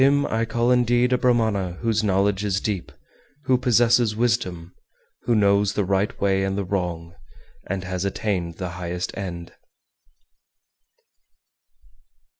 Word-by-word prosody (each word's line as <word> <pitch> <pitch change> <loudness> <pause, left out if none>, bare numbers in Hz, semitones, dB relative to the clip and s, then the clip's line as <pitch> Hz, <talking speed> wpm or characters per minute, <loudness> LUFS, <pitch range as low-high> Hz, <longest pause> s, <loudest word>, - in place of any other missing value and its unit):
403. 140 +2 +5
Him 145 - 0
I 115 +1 +1
call 120 +2 0
indeed 125 0 +3
a - - +3
Brahmana 110 -7 +1
whose 110 -2 0
knowledge 100 0 +1
is 100 -2 0
deep, 100 -4 -3 0.5
who 130 -2 +3
possesses 120 -2 +3
wisdom, 100 -8 -1 0.5
who 120 - +2
knows 100 -1 +3
the 105 - 0
right 95 +2 -1
way 95 -1 +1
and 95 0 -1
the 100 - -1
wrong, 85 -3 -3 0.5
and 95 0 -3
has 90 0 -3
attained 95 -4 -2
the 90 0 -5
highest 90 0 -5
end. 85 -3 -6
100 Hz, 135 wpm, -23 LUFS, 90-115 Hz, 0.5 s, 403